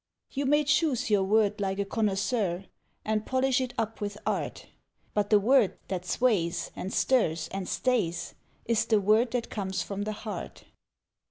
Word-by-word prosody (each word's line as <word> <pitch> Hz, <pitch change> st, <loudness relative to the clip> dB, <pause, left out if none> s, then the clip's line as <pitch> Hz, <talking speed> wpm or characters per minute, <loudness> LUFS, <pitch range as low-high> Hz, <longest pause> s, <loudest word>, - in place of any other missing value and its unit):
You 275 Hz, 0 st, -2 dB
may 295 Hz, +2 st, +4 dB
choose 290 Hz, -5 st, +1 dB
your 205 Hz, -2 st, +4 dB
word 210 Hz, +1 st, +2 dB
like 195 Hz, -1 st, -1 dB
a 200 Hz, -, 0 dB
connoisseur, 195 Hz, -2 st, 0 dB, 0.4 s
And 215 Hz, 0 st, 0 dB
polish 260 Hz, +1 st, +1 dB
it 255 Hz, -1 st, -4 dB
up 225 Hz, 0 st, -2 dB
with 205 Hz, 0 st, -3 dB
art, -, -, -2 dB, 0.5 s
But 205 Hz, -1 st, 0 dB
the 210 Hz, -, +6 dB
word 235 Hz, 0 st, +3 dB
that 180 Hz, -2 st, -3 dB
sways, 185 Hz, -6 st, +1 dB
and 190 Hz, -, -5 dB
stirs, 165 Hz, -11 st, +2 dB
and 195 Hz, -1 st, -4 dB
stays, 190 Hz, -10 st, 0 dB, 0.3 s
Is 230 Hz, -1 st, +2 dB
the 220 Hz, -2 st, +3 dB
word 215 Hz, +5 st, +3 dB
that 240 Hz, 0 st, -3 dB
comes 190 Hz, -3 st, -2 dB
from 200 Hz, 0 st, -5 dB
the 215 Hz, +1 st, -2 dB
heart. 215 Hz, -, -6 dB
210 Hz, 165 wpm, -28 LUFS, 195-245 Hz, 0.5 s, the